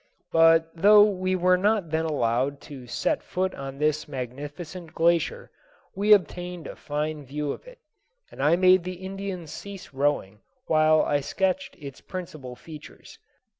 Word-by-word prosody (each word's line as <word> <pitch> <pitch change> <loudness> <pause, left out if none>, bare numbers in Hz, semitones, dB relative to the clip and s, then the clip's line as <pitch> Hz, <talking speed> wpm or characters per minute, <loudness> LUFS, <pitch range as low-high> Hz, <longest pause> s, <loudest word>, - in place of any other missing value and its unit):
But 165 0 +5
though 205 +5 +7
we 185 -2 0
were 180 0 +3
not 200 -4 +1
then 160 0 0
allowed 135 -1 0
to 130 -4 -11
set - - -1
foot 185 +1 -2
on 135 0 -7
this 150 +1 0
magnificent 145 +6 -7
glacier, 170 - +1 0.4
we 205 +2 0
obtained 180 -3 +2
a - - -7
fine 150 0 -4
view 145 +2 -3
of - - -9
it, - - -13 0.5
and - - -8
I 150 +4 +4
made 185 0 +5
the 185 +1 -5
Indians 190 -4 -6
cease 195 -1 -9
rowing 135 -8 -1 0.3
while 155 0 +4
I 145 - +1
sketched 190 - -1
its 140 -3 -10
principal 155 -9 -8
features. 155 +2 -13
165 Hz, 150 wpm, -26 LUFS, 145-185 Hz, 0.5 s, though